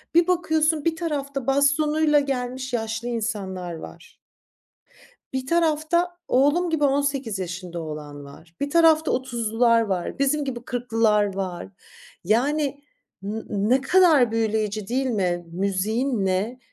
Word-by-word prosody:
Bir 340 Hz, 0 st, +5 dB
bakıyorsun, 320 Hz, -3 st, +1 dB
bir 330 Hz, -, +1 dB
tarafta 280 Hz, -6 st, -3 dB
bastonuyla 295 Hz, +2 st, +3 dB
gelmiş 260 Hz, -2 st, -3 dB
yaşlı 225 Hz, 0 st, -2 dB
insanlar 200 Hz, -6 st, -3 dB
var. 160 Hz, -, -12 dB, 1.1 s
Bir 260 Hz, 0 st, -3 dB
tarafta 335 Hz, +2 st, +1 dB
oğlum 290 Hz, +7 st, +2 dB
gibi 315 Hz, -2 st, +1 dB
18 275 Hz, -6 st, 0 dB
yaşında 175 Hz, -1 st, -5 dB
olan 150 Hz, -2 st, -7 dB
var. 160 Hz, +4 st, -15 dB
Bir 285 Hz, -, -2 dB
tarafta 320 Hz, -1 st, +4 dB
30’lular 235 Hz, -2 st, +1 dB
var. 190 Hz, -6 st, -2 dB
Bizim 280 Hz, +2 st, +1 dB
gibi 245 Hz, -4 st, -5 dB
40’lılar 225 Hz, -5 st, +1 dB
var. 185 Hz, -3 st, -4 dB, 0.6 s
Yani, 280 Hz, -, 0 dB, 0.4 s
n 210 Hz, +3 st, -4 dB
ne 215 Hz, +6 st, +1 dB
kadar 295 Hz, -5 st, +4 dB
büyüleyici 215 Hz, -2 st, -1 dB
değil 260 Hz, +3 st, 0 dB
mi? 180 Hz, -7 st, -1 dB
Müziğin 200 Hz, +6 st, -1 dB
ne 200 Hz, +7 st, -1 dB
245 Hz, 120 wpm, -24 LUFS, 205-290 Hz, 1.1 s, Bir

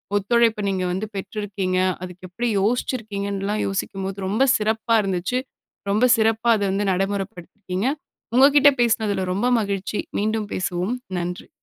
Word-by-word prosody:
ஒத்துழைப்ப 220 Hz, +1 st, +2 dB
நீங்க 190 Hz, -1 st, -1 dB
வந்து 190 Hz, +4 st, -2 dB
பெற்றிருக்கீங்க. 195 Hz, -2 st, -3 dB, 0.2 s
அதுக்கு 180 Hz, 0 st, -8 dB
எப்படி 235 Hz, +7 st, -2 dB
யோசிச்சிருக்கீங்கன்னுலாம் 205 Hz, -3 st, -1 dB
யோசிக்கும்போது 195 Hz, 0 st, -3 dB
ரொம்ப 215 Hz, +7 st, +2 dB
சிறப்பா 220 Hz, +1 st, +1 dB
இருந்துச்சு. 195 Hz, +5 st, -1 dB, 0.5 s
ரொம்ப 215 Hz, +5 st, +3 dB
சிறப்பா 225 Hz, +1 st, +2 dB
அத 205 Hz, -, -1 dB
வந்து 200 Hz, +1 st, 0 dB
நடைமுறப்படுத்திருக்கீங்க. 195 Hz, +1 st, -3 dB, 0.5 s
உங்க 265 Hz, -, +8 dB
கிட்ட 290 Hz, 0 st, +8 dB
பேசினதுல 215 Hz, -5 st, +1 dB
ரொம்ப 205 Hz, +6 st, 0 dB
மகிழ்ச்சி. 200 Hz, 0 st, -3 dB, 0.2 s
மீண்டும் 215 Hz, 0 st, -1 dB
பேசுவோம். 185 Hz, +4 st, -1 dB, 0.2 s
நன்றி. 175 Hz, +1 st, -5 dB
200 Hz, 125 wpm, -22 LUFS, 190-220 Hz, 0.5 s, உங்க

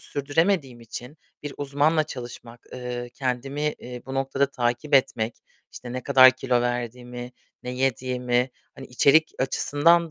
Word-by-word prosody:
sürdüremediğim 145 Hz, -2 st, 0 dB
için, 125 Hz, +5 st, -8 dB, 0.3 s
bir 145 Hz, -1 st, -6 dB
uzmanla 145 Hz, +3 st, +2 dB
çalışmak, 120 Hz, -4 st, -9 dB
eee, 125 Hz, -1 st, -5 dB
kendimi, 135 Hz, +3 st, -2 dB
iii, 125 Hz, 0 st, -9 dB
bu 135 Hz, -, -6 dB
noktada 135 Hz, +1 st, +1 dB
takip 125 Hz, +4 st, -1 dB
etmek, 120 Hz, -4 st, +2 dB, 0.4 s
işte 120 Hz, -1 st, -8 dB
ne 130 Hz, 0 st, -4 dB
kadar 130 Hz, -2 st, +8 dB
kilo 130 Hz, -1 st, 0 dB
verdiğimi, 120 Hz, 0 st, -4 dB, 0.3 s
ne 125 Hz, -, -5 dB
yediğimi, 125 Hz, -1 st, 0 dB, 0.2 s
hani 135 Hz, -, -10 dB
içerik 140 Hz, +5 st, +4 dB
açısından 160 Hz, +5 st, +3 dB
130 Hz, 130 wpm, -25 LUFS, 125-145 Hz, 0.4 s, kadar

